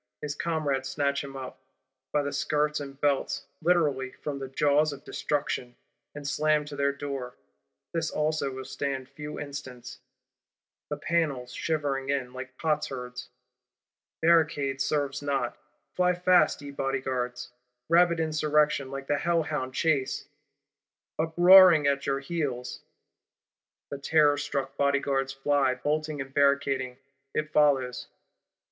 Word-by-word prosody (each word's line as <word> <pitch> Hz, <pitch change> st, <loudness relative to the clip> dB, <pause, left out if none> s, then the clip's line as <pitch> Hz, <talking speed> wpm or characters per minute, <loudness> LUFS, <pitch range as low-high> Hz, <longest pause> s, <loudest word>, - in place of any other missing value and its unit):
His 145 Hz, -1 st, -4 dB
comrades 145 Hz, -4 st, -1 dB
snatch 140 Hz, -1 st, 0 dB
him 135 Hz, -1 st, -8 dB
up, 130 Hz, -1 st, -8 dB, 0.5 s
by 150 Hz, -, +1 dB
the 140 Hz, -, -3 dB
skirts 150 Hz, +1 st, 0 dB
and 140 Hz, -1 st, -8 dB
belts; 145 Hz, -2 st, 0 dB, 0.2 s
literally, 145 Hz, -7 st, +1 dB
from 145 Hz, -2 st, -3 dB
the 135 Hz, -, -5 dB
jaws 145 Hz, +3 st, +2 dB
of 140 Hz, -, -11 dB
Destruction; 135 Hz, -4 st, -2 dB, 0.4 s
and 145 Hz, -1 st, -6 dB
slam 150 Hz, 0 st, +2 dB
to 145 Hz, -1 st, -8 dB
their 140 Hz, 0 st, +1 dB
Door. 140 Hz, -3 st, -5 dB, 0.6 s
This 165 Hz, -2 st, 0 dB
also 155 Hz, -2 st, 0 dB
will 130 Hz, 0 st, -7 dB
stand 135 Hz, -2 st, -3 dB
few 150 Hz, +1 st, -8 dB
instants; 130 Hz, -4 st, -8 dB, 0.9 s
the 150 Hz, -, -3 dB
panels 145 Hz, -6 st, -1 dB
shivering 140 Hz, -4 st, -2 dB
in, 130 Hz, -3 st, -1 dB
like 130 Hz, 0 st, -8 dB
potsherds. 130 Hz, -5 st, -3 dB, 0.9 s
Barricading 150 Hz, -5 st, +3 dB
serves 145 Hz, 0 st, -1 dB
not: 135 Hz, -4 st, -1 dB, 0.4 s
fly 180 Hz, 0 st, +3 dB
fast, 180 Hz, -4 st, +3 dB
ye 140 Hz, -, -7 dB
Bodyguards; 130 Hz, -3 st, -3 dB, 0.4 s
rabid 170 Hz, 0 st, +4 dB
Insurrection, 150 Hz, -3 st, +1 dB
like 135 Hz, 0 st, -6 dB
the 145 Hz, +1 st, 0 dB
hellhound 150 Hz, -6 st, -1 dB
Chase, 145 Hz, -5 st, 0 dB, 0.9 s
uproaring 175 Hz, 0 st, +7 dB
at 140 Hz, 0 st, +1 dB
your 135 Hz, 0 st, 0 dB
heels! 135 Hz, -5 st, -3 dB, 1.1 s
The 140 Hz, -, -4 dB
terrorstruck 145 Hz, -2 st, +1 dB
Bodyguards 140 Hz, -1 st, +1 dB
fly, 135 Hz, -1 st, +1 dB
bolting 150 Hz, +2 st, -2 dB
and 135 Hz, 0 st, -6 dB
barricading; 140 Hz, -2 st, +1 dB, 0.4 s
it 155 Hz, 0 st, -1 dB
follows. 135 Hz, -5 st, +2 dB
140 Hz, 125 wpm, -28 LUFS, 135-150 Hz, 1.1 s, uproaring